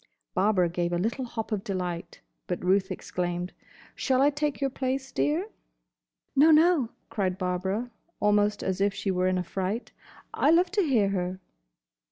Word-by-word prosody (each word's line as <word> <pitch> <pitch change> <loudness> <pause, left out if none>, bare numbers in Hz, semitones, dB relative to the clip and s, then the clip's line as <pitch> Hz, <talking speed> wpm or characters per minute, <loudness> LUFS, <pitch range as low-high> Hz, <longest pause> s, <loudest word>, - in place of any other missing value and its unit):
Barbara 185 -2 +3
gave 175 0 -1
a - - +2
little 230 +8 -1
hop 225 -2 -5
of 205 -2 -1
delight, 180 -4 -4 0.3
but 180 0 -3
Ruth 190 +1 +3
exclaimed, 180 -1 -3 0.4
"Shall 260 -2 +1
I 285 +2 +5
take 295 0 -2
your 275 -1 0
place, 265 +1 -2
dear?" 340 +8 0 0.9
"No, 290 +4 +6
no," 315 -5 +5 0.2
cried 190 -4 -1
Barbara, 190 +6 -2 0.3
almost 205 0 +2
as 190 0 -1
if 200 0 +2
she 195 - -1
were 185 0 +1
in 185 0 +1
a 180 - -1
fright, 190 +6 -3 0.4
"I - - +3
love 350 +2 +4
to 415 0 +2
hear 240 - +3
her." 185 -1 -2
205 Hz, 165 wpm, -27 LUFS, 185-270 Hz, 0.9 s, No